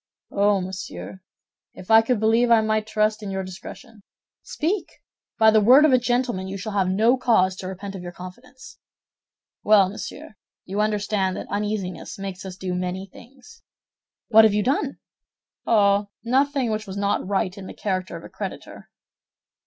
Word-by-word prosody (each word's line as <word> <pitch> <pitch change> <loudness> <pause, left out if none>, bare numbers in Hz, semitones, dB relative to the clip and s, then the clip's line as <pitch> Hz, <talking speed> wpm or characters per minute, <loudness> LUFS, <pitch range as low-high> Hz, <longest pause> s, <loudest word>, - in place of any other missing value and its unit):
"Oh, 200 -1 +2
monsieur, 185 0 -7 0.5
if 185 - -8
I 225 0 +8
could 230 0 0
believe 225 +3 +3
I 230 -1 +6
might 215 0 0
trust 215 0 0
in 205 - -6
your 190 0 -3
discretion." 205 +4 -11 0.4
"Speak! 350 +3 -3 0.4
By 220 -1 +6
the 215 0 +4
word 255 +8 +7
of 295 - +4
a 255 - +5
gentleman, 240 -6 -1
you 195 +1 -5
shall 205 +3 -5
have 195 -2 +1
no 225 +7 +3
cause 190 -7 +2
to 185 - -6
repent 195 +1 -7
of 190 - -7
your 175 0 -7
confidence." 250 +11 -12 0.8
"Well, 205 -3 +5
monsieur, 220 +5 -9 0.3
you 200 +3 -2
understand 205 -3 0
that - - -6
uneasiness 205 -3 -3
makes 195 -1 -7
us 185 -1 -7
do 185 -1 -4
many 180 +1 -3
things." 270 - -17 0.7
"What 220 -1 +7
have 215 -2 +4
you 210 - +1
done?" 275 +3 -1 0.7
"Oh, 200 -2 +3
nothing 265 0 +1
which 215 0 -3
was 195 +1 -6
not 200 -2 -1
right 190 -1 -1
in 195 -2 -9
the - - -8
character 185 -4 -3
of 165 - -12
a - - -10
creditor." - - -8
210 Hz, 170 wpm, -23 LUFS, 190-230 Hz, 0.8 s, I